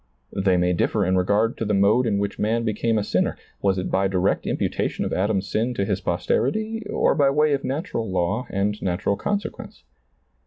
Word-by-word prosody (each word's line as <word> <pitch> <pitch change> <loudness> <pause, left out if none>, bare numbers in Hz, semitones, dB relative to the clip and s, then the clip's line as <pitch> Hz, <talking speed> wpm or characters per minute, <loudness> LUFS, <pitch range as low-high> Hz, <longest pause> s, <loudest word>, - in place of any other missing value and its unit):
They 95 -2 +2
may 90 0 +2
differ 100 +4 +1
in 95 +1 +2
regard 100 +5 +1
to 115 - -2
the 105 -1 +1
mode 105 +6 +3
in 105 -3 +1
which 100 0 -2
man 115 +2 +1
became 110 +1 0
a 105 - +1
sinner - - 0
— - - -36
was 95 -1 +2
it 95 - -3
by 95 +1 +2
direct 95 0 0
imputation - - -1
of - - -2
Adam's 100 0 0
sin 120 +3 -1
to 100 - 0
his - - -1
posterity 220 - -1
or - - +2
by 140 -3 +3
way 150 +1 +3
of 135 - -1
natural 130 - -3
law 95 +7 -1
and 105 +2 -1
natural 95 +2 0
consequence 205 - -4
105 Hz, 200 wpm, -23 LUFS, 95-120 Hz, -, mode